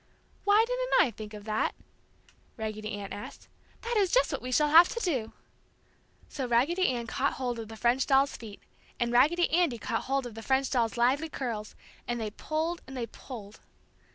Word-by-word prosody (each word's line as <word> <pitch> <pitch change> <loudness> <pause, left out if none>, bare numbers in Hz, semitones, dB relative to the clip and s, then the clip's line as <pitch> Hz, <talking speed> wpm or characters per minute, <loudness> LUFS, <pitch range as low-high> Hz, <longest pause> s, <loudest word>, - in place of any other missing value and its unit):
"Why 415 +2 +5
didn't - - -2
I 245 - +4
think 215 0 -9
of 210 - -9
that?" 215 0 -1 0.8
Raggedy 215 -1 -4
Ann 200 -2 -6
asked. 205 +1 -9 0.4
"That 470 0 -1
is 395 -3 +3
just - - +3
the - - -1
way - - -12
we 255 - -3
shall 295 +4 +3
have 335 +4 +8
to 470 - -4
do!" 265 - -1 1.0
So 265 -3 -4
Raggedy 290 +11 +2
Ann 240 -2 -1
caught 265 +4 0
hold 245 -3 -3
of 225 - -6
the 220 - -9
French 240 +4 +2
doll's 275 +1 +3
feet, 215 -3 -10 0.4
and 240 -1 0
Raggedy 305 +9 +4
Andy 330 -7 +2
caught 225 +1 -3
hold 270 0 0
of 240 - -7
the 225 - -8
French 265 +2 +1
doll's 235 -2 +1
lively 270 +7 +2
curls, 230 -7 -4 0.3
and 240 0 -2
they 215 -2 -3
pulled 320 +8 -2
and 265 0 -8
they 240 - -2
pulled. 220 -3 -10
250 Hz, 195 wpm, -29 LUFS, 225-310 Hz, 1.0 s, have